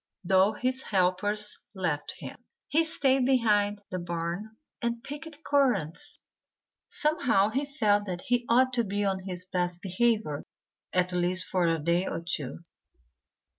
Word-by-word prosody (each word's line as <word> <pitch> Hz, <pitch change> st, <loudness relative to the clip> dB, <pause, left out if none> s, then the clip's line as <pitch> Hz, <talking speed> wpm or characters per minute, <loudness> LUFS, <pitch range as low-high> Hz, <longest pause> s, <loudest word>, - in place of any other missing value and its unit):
Though 190 Hz, +3 st, +4 dB
his 255 Hz, +1 st, -1 dB
helpers 205 Hz, +2 st, 0 dB, 0.2 s
left 165 Hz, -6 st, -2 dB
him, -, -, -7 dB, 0.3 s
he 320 Hz, +3 st, +3 dB
stayed 270 Hz, -5 st, +3 dB
behind 210 Hz, -5 st, +2 dB
the 185 Hz, -, -2 dB
barn 175 Hz, +5 st, -4 dB, 0.2 s
and 235 Hz, -1 st, -2 dB
picked 300 Hz, +1 st, -8 dB
currants. 245 Hz, -, +1 dB, 0.7 s
Somehow 265 Hz, -10 st, +2 dB
he 270 Hz, +6 st, -1 dB
felt 210 Hz, -7 st, +2 dB
that 180 Hz, -1 st, -3 dB
he 245 Hz, -1 st, 0 dB
ought 255 Hz, +2 st, +4 dB
to 240 Hz, -1 st, +2 dB
be 205 Hz, 0 st, -1 dB
on 190 Hz, -1 st, 0 dB
his 180 Hz, -1 st, -4 dB
best 180 Hz, -2 st, -2 dB
behavior 195 Hz, -5 st, 0 dB, 0.5 s
at 180 Hz, 0 st, +1 dB
least 180 Hz, +1 st, +2 dB
for 180 Hz, -2 st, +1 dB
a 165 Hz, 0 st, +2 dB
day 170 Hz, +4 st, +1 dB
or 165 Hz, -, -2 dB
two. 155 Hz, 0 st, -4 dB
205 Hz, 140 wpm, -28 LUFS, 180-245 Hz, 0.7 s, Though